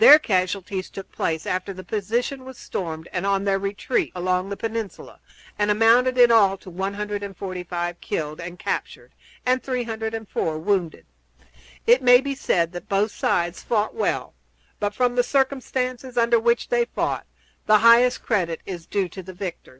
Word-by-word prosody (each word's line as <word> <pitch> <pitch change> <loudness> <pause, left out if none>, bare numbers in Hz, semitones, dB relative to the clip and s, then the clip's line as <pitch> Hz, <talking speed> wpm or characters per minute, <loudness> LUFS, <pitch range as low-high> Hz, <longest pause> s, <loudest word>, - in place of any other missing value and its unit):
Their 445 -10 +11
casualties 190 - -1
took 195 - -9
place 160 -1 -2
after 185 +2 -2
the 185 0 -9
position 230 +8 -2
was 260 -1 -10
stormed 160 -3 -5
and 180 - -2
on 195 0 +1
their 195 -1 +1
retreat 200 +6 -1
along 185 +1 0
the 200 - -4
peninsula, 225 -3 -5 0.4
and 205 0 +2
amounted 230 +4 +4
in 240 -1 +7
all 200 -4 +5
to 185 - -12
145 190 -3 -4
killed 155 -6 -3
and 175 +1 -7
captured - - -4 0.3
and 255 0 +2
304 225 -8 -3
wounded. 170 - -1 0.8
It 245 +3 +5
may 245 -1 +7
be 275 +1 -3
said 170 -10 0
that 175 -1 -9
both 200 +2 +1
sides 175 -3 -1
fought 215 -2 0
well; 450 - -2 0.5
but, 205 0 -2
from 250 0 +2
the 245 - +4
circumstances 255 -1 -1
under 235 0 +4
which 235 +1 +1
they 485 -1 +2
fought, - - -3 0.4
the 215 0 +7
highest 235 +3 +5
credit 175 -7 0
is 175 -3 -7
due 200 -2 0
to 190 - -8
the 185 +1 -10
victors. 185 -1 -6
205 Hz, 160 wpm, -23 LUFS, 185-240 Hz, 0.8 s, Their